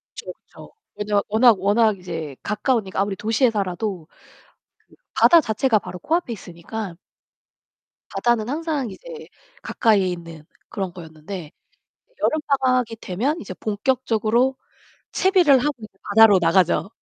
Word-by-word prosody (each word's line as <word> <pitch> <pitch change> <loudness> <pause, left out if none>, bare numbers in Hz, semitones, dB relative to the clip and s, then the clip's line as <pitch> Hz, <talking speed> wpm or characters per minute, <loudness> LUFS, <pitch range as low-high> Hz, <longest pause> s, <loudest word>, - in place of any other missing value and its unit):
그쵸, - - -7
그쵸. - - -16 0.3
왜냐면 205 -1 0
워낙 220 -1 +4
워낙 210 +2 +2
이제 165 -6 -6
가까우니까 210 -2 -1
아무리 200 -1 -1
도시에 225 +5 +1
살아도 195 -4 -3
그 - - -24 0.9
바다 340 - +6
자체가 225 -2 +1
바로 180 - -9
코 315 - -2
앞에 345 -9 -4
있으니까. 185 0 -7 1.2
바다는 240 -2 0
항상 300 -4 -2
이제 480 - -10 0.3
가까이에 210 -5 +2
있는 170 -3 -7 0.3
그런 190 -3 -4
거였는데 160 0 -9 0.7
여름 310 - +1 0.2
방학이 250 -3 +1
되면 255 - -2
이제 190 -3 -8
본격적으로 235 +3 0 0.6
채비를 360 -8 +4
하고 295 +4 -1
이제 210 -3 -13
바다로 205 -1 +6
나가죠. 175 +3 +2
215 Hz, 310 characters per minute, -22 LUFS, 185-250 Hz, 1.2 s, 바다